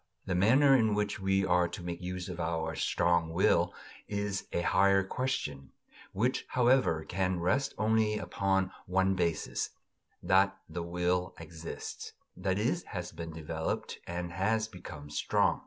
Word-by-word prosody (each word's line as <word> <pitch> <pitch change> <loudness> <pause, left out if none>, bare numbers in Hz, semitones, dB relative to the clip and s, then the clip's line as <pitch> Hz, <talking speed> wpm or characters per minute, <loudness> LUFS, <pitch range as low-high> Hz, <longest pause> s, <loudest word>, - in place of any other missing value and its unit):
The 95 - -1
manner 130 +10 +5
in 110 -4 +3
which 105 0 -1
we 95 0 +2
are 90 -1 +3
to 90 - -7
make 85 0 -5
use 90 0 -4
of 90 -2 -6
our 80 -1 -1
strong 85 +1 +1
will 85 +3 +3 0.4
is 100 -1 -2
a 85 - 0
higher 95 +2 +4
question, 95 - -3 0.4
which, 120 +7 0
however, 125 -10 +3
can 95 0 0
rest 130 +11 +1
only 110 0 +2
upon 95 +1 0 0.2
one 95 +1 +2
basis: 85 -4 -1 0.5
that 95 +1 +3
the 85 +2 -5
will 90 +1 -1
exists 85 0 -7 0.2
that 95 0 -1
is, 120 +11 +1
has 90 -2 -5
been 80 0 -7
developed, 80 0 -4
and 85 0 -4
has 110 +5 +1
become 80 -8 -10
strong. - - +2
90 Hz, 145 wpm, -31 LUFS, 85-105 Hz, 0.5 s, manner